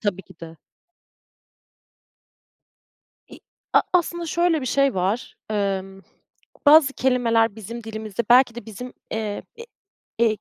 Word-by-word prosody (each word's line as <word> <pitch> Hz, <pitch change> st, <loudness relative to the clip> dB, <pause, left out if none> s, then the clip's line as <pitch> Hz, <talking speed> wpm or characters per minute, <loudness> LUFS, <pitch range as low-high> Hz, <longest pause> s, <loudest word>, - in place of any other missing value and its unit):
Tabii 200 Hz, -3 st, -2 dB
ki -, -, -17 dB
de. 165 Hz, -1 st, -10 dB, 2.7 s
İ -, -, -14 dB, 0.3 s
a -, -, +6 dB
aslında 345 Hz, -1 st, 0 dB
şöyle 335 Hz, -1 st, +1 dB
bir -, -, -4 dB
şey 275 Hz, 0 st, +1 dB
var, 190 Hz, +6 st, -2 dB
emm, 195 Hz, -2 st, -2 dB, 0.6 s
bazı 290 Hz, -2 st, +7 dB
kelimeler 230 Hz, -4 st, +1 dB
bizim 230 Hz, +2 st, -8 dB
dilimizde 220 Hz, 0 st, -5 dB
belki 245 Hz, -1 st, +5 dB
de 240 Hz, -, -8 dB
bizim, 245 Hz, +3 st, -9 dB, 0.2 s
eee, 215 Hz, -2 st, -3 dB
e 470 Hz, -, -8 dB, 0.6 s
e 220 Hz, -2 st, +1 dB
230 Hz, 120 wpm, -23 LUFS, 205-265 Hz, 2.7 s, bazı